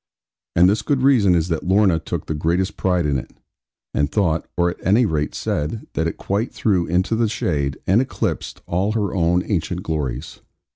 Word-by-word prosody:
And 90 +1 +6
this 100 +2 +2
good 135 +3 0
reason 115 -10 +5
is 85 0 +1
that 80 -2 -1
Lorna 95 -3 +4
took - - -5
the - - -2
greatest 85 +6 0
pride 90 -3 +1
in 70 -2 +1
it, 65 - -9 0.6
and 75 0 0
thought 85 -6 +1
(or 85 0 +2
at - - -12
any 110 +6 +4
rate 75 -6 -1
said) 75 +10 -2
that 80 - 0
it 80 - -4
quite 100 +5 -2
threw 95 -6 +1
into 90 +6 +1
the 115 -1 +1
shade, 70 -9 -1
and 100 +6 +4
eclipsed, 135 - -3
all 95 +5 0
her 105 -3 -1
own 90 -1 +2
ancient 90 -2 -2
glories. 75 -8 -4
90 Hz, 190 wpm, -21 LUFS, 80-105 Hz, 0.6 s, And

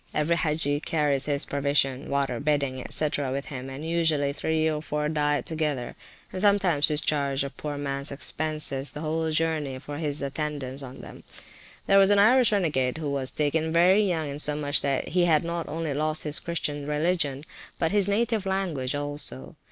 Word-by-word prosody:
Every 155 +3 +2
Hagge 150 -3 0
carries 145 -3 +1
his 145 -1 0
provisions, 140 -2 0
water, 140 -4 -1
bedding, 140 -3 -1
&c., 155 - +3
with 140 0 -3
him, 135 -2 -7
and 140 +4 -7
usually 160 -4 +1
three 160 +1 0
or 155 -1 -1
four 150 -1 -2
diet 150 -2 0
together, 150 -6 -2 0.4
and 185 - -1
sometimes 195 -7 +3
discharge 145 -3 +1
a 140 - -5
poor 150 -1 -6
mans 140 0 -2
expenses 145 -1 0
the 150 - -7
whole 160 +1 -1
journey 155 -4 -1
for 145 +2 -7
his 145 -3 -2
attendance 140 -1 -4
on 130 -1 -9
them. - - -12 0.6
There 195 - +5
was 195 0 +5
an 205 - +5
Irish 240 +4 +5
renegade, 150 -10 0
who 150 -3 -3
was 135 -2 0
taken 155 +2 0
very 180 +5 +5
young, 170 -7 0
insomuch 145 0 +1
that 140 -2 -1
he 175 +1 +2
had 160 -2 +3
not 170 0 -4
only 160 -2 -3
lost 155 +2 0
his 150 -1 -1
Christian 145 -4 -3
religion, 150 -2 -1 0.3
but 165 - 0
his 205 -2 +3
native 215 0 0
language 165 -9 -1
also. 145 - -4
150 Hz, 175 wpm, -26 LUFS, 140-165 Hz, 0.6 s, There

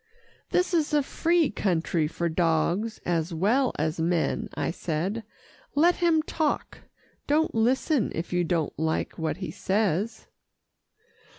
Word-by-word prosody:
"This 360 0 +1
is 310 -3 +2
a 295 - +3
free 335 +2 +1
country 170 -5 0
for 170 +2 -2
dogs 170 +6 0
as 165 -1 -1
well 235 +10 +2
as 155 +2 -1
men," 165 0 0
I - - -1
said. 180 +7 -2 0.5
"Let 340 +4 +4
him 330 -3 +3
talk. 310 -1 -2 0.5
Don't 310 +2 +2
listen, 250 +4 +2
if 165 +2 -4
you 175 0 +2
don't 165 -2 0
like 160 +1 -1
what 160 +1 -1
he 185 -5 -5
says." 205 +3 -1
190 Hz, 130 wpm, -27 LUFS, -, 0.5 s, Let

